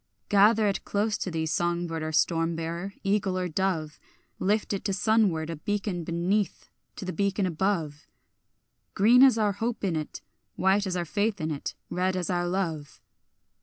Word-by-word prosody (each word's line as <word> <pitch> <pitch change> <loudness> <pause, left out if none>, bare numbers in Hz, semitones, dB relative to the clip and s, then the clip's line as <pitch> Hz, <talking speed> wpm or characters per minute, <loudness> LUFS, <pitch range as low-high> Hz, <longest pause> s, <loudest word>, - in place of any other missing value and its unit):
Gather 210 +2 +5
it 200 - -1
close 210 +1 0
to - - -2
thee, 160 -2 -2
song 175 +2 0
bird 165 -1 -4
or 155 0 -3
storm 165 +1 +1
bearer, 170 +4 -4
eagle 195 -2 +1
or 180 -1 -1
dove, 160 -4 -2 0.4
Lift 210 +2 0
it 195 - -3
to 200 - 0
sunward, 190 -6 +2
a 165 - -5
beacon 200 0 -2
beneath 175 +5 -1 0.3
to - - -7
the 185 - -3
beacon 200 +2 0
above, 165 -4 -2 0.9
Green 235 +6 +6
as 265 -3 +7
our 210 -2 +2
hope 225 +4 -3
in 185 -4 0
it, 155 -1 -5 0.3
white 190 +2 +2
as 180 -1 -2
our 175 - -1
faith 205 +3 -1
in 155 -1 -2
it, 145 - -4 0.2
red 185 +1 0
as 180 -1 -2
our 175 0 0
love. 165 -6 -3
185 Hz, 175 wpm, -27 LUFS, 165-205 Hz, 0.9 s, as